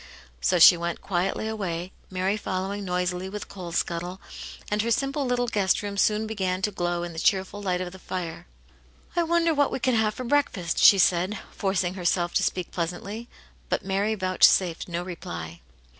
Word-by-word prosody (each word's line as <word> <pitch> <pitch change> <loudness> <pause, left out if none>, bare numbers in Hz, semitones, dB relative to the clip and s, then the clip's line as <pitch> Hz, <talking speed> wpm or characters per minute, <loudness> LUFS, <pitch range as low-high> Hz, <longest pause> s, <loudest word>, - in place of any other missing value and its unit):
So 180 - +2
she 175 +1 +9
went 170 0 -3
quietly 190 +3 -1
away, 185 -5 -3 0.2
Mary 190 +2 0
following 200 0 -3
noisily 180 0 -2
with 210 +1 -5
the - - -15
coal 180 -3 -7
scuttle, 175 +2 -2 0.5
and 210 0 +2
her 230 - -1
simple 275 +4 0
little 245 0 +1
guest 205 -4 +1
room 200 -1 -4
soon 210 +2 +2
began 190 -4 -2
to 210 - +1
glow 175 -2 -2
in 175 -1 -5
the 160 - -5
cheerful 195 +3 +1
light 180 -2 -1
of 180 -1 -4
the 190 - -12
fire. 175 - -5 0.7
I 345 - +3
wonder 335 0 +2
what 285 -2 +2
we - - -1
can 255 0 +1
have 220 -2 +2
for 255 - -5
breakfast," 235 -10 0
she 200 - +8
said, 185 +3 +2
forcing 190 -2 -1
herself 175 -1 0
to - - +2
speak 180 -2 -1
pleasantly; 190 +7 -4 0.4
but - - -1
Mary 200 +3 0
vouchsafed 185 -2 +3
no 175 0 -3
reply. 85 - -7
190 Hz, 185 wpm, -26 LUFS, 175-210 Hz, 0.7 s, she